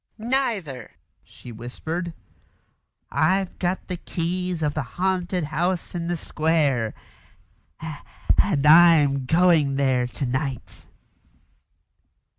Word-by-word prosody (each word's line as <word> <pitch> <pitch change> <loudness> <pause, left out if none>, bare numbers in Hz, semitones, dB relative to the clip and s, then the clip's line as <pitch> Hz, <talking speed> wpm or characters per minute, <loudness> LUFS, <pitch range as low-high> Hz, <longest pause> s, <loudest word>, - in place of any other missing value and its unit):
"Neither," 215 - -2 0.3
she 125 - -13
whispered. 160 +10 -5 1.0
"I've 185 +4 +1
got 180 +1 -2
the 180 - -4
keys 175 0 -3
of 150 -1 0
the 155 - -2
haunted 180 +5 -2
house 170 +4 -2
in 170 -1 -3
the 175 0 -1
square 150 -9 0 1.4
and 155 -9 +2
I'm 150 -4 +6
going 160 -4 +3
there 130 -3 +1
to 135 - -4
night." 130 0 -4
160 Hz, 95 wpm, -24 LUFS, 140-180 Hz, 1.4 s, I'm